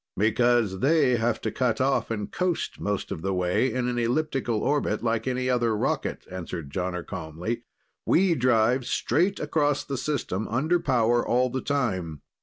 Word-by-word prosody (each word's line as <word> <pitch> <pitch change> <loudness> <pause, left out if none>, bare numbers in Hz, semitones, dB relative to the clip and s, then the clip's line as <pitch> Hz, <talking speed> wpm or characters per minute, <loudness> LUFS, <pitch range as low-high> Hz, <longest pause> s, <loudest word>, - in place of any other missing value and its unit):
"Because 110 -1 +2
they 140 -2 +3
have 115 +1 0
to - - -2
cut 120 -4 0
off 135 +1 +1
and 105 -3 -3
coast 180 -2 -2
most 105 -1 -2
of - - -4
the 95 +1 -1
way 90 +8 +1
in 125 -1 -1
an 120 -1 -1
elliptic 135 +2 -1
orbit, 115 0 0
like 115 0 0
any 130 0 -1
other 120 -3 +1
rocket," - - -2
answered 85 -5 -6
Jonner 90 0 -3
calmly. 85 +9 -5 0.4
"We 185 0 +3
drive 125 -2 +2
straight 175 - +1
across 145 -1 +1
the 140 - -3
system, 125 -8 -2
under 155 +9 +1
power 120 -6 +2
all 125 +1 +1
the 130 +1 -2
time. 95 - -2
120 Hz, 165 wpm, -26 LUFS, 105-135 Hz, 0.4 s, they